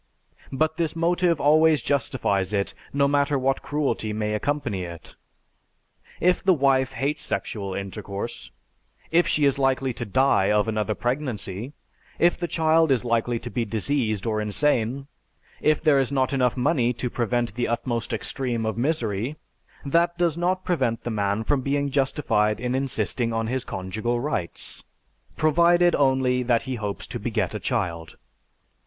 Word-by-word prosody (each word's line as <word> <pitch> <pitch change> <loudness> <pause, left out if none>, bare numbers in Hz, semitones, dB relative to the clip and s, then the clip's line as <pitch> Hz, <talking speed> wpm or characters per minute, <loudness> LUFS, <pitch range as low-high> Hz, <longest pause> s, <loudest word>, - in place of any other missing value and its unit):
But 155 +4 0
this 165 -2 -1
motive 170 0 +2
always 155 +1 +5
justifies 105 -8 0
it, 100 -1 0 0.2
no 140 0 +2
matter 140 0 +2
what 135 +1 0
cruelty 145 -7 -1
may 105 0 -1
accompany 125 -4 -1
it. 85 -2 -9 1.0
If 180 0 +2
the 190 -2 +4
wife 135 -2 +2
hates 150 +2 -1
sexual 100 -9 -3
intercourse, 100 +3 -6 0.6
if 175 +2 +4
she 150 - +2
is 140 0 +2
likely 135 -1 +1
to - - -5
die 130 -2 +2
of 105 +1 +2
another 110 -1 -1
pregnancy, 120 -3 -3 0.4
if 175 +1 +4
the 175 - -3
child 160 -1 +3
is 125 -2 +2
likely 115 0 +1
to 120 - -7
be 120 - -1
diseased 110 -1 -1
or 110 -2 0
insane, 125 +3 +1 0.6
if 155 0 +3
there 150 -4 +4
is 135 0 0
not 130 -1 +1
enough 125 -2 +1
money 125 -2 +2
to 125 - -3
prevent 120 -2 -1
the 120 +2 -1
utmost 120 -1 -2
extreme 120 -4 -2
of 110 0 -2
misery, 120 -3 -1 0.5
that 170 +4 +2
does 170 -3 +1
not 180 +2 -1
prevent 125 -10 0
the 120 - -3
man 100 0 0
from 140 +3 +1
being 140 +1 -1
justified 130 -6 +1
in 125 +1 -2
insisting 130 -3 -1
on 115 0 -1
his 125 +2 -2
conjugal 110 +6 -3
rights, 120 - -4 0.5
provided 170 +2 +4
only 130 -2 +2
that 120 -2 +1
he 130 - -4
hopes 105 -4 -4
to - - -6
beget - - -1
a - - -3
child." 85 -2 -3
130 Hz, 155 wpm, -24 LUFS, 110-145 Hz, 1.0 s, always